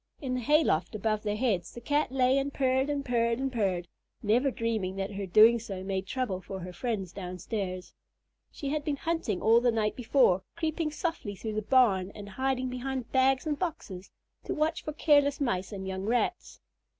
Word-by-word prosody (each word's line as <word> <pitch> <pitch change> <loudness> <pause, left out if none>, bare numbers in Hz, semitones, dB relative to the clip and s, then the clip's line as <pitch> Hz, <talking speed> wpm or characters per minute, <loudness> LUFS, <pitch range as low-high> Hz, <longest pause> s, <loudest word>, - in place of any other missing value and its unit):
In 260 -3 -3
the 255 - 0
hay 300 +6 +4
loft 240 - 0
above 215 0 0
their 210 -1 -1
heads, 210 -7 0
the - - -6
Cat 290 +3 0
lay 260 0 +3
and 275 +1 -2
purred 265 0 +1
and 285 -1 -2
purred 235 -2 +1
and 265 0 -2
purred, 185 -6 0 0.4
never 240 +6 +3
dreaming 225 -6 -2
that 195 +1 -3
her 200 -1 -4
doing 220 +6 +7
so 195 -4 -6
made 190 0 -3
trouble 210 -8 -2
for 190 0 -7
her 180 +1 -7
friends 195 -3 -3
downstairs. 185 0 -5 0.6
She 280 - -5
had 300 +1 -1
been 295 -1 -1
hunting 325 - -2
all 230 +2 +5
the 245 - +3
night 220 -2 0
before, 245 -6 +3
creeping 320 -1 -1
softly 305 - -3
through 220 +3 -5
the 215 - -1
barn 200 -6 +3
and 205 -1 -8
hiding 260 +3 -1
behind 255 0 -4
bags 265 +1 +3
and 295 -2 -1
boxes 210 - -5 0.4
to - - -2
watch 315 +1 0
for 305 - -4
careless 285 -2 +3
Mice 190 -9 -1
and 190 -2 -6
young 190 0 -4
Rats. 240 +2 -1
235 Hz, 195 wpm, -29 LUFS, 195-270 Hz, 0.6 s, doing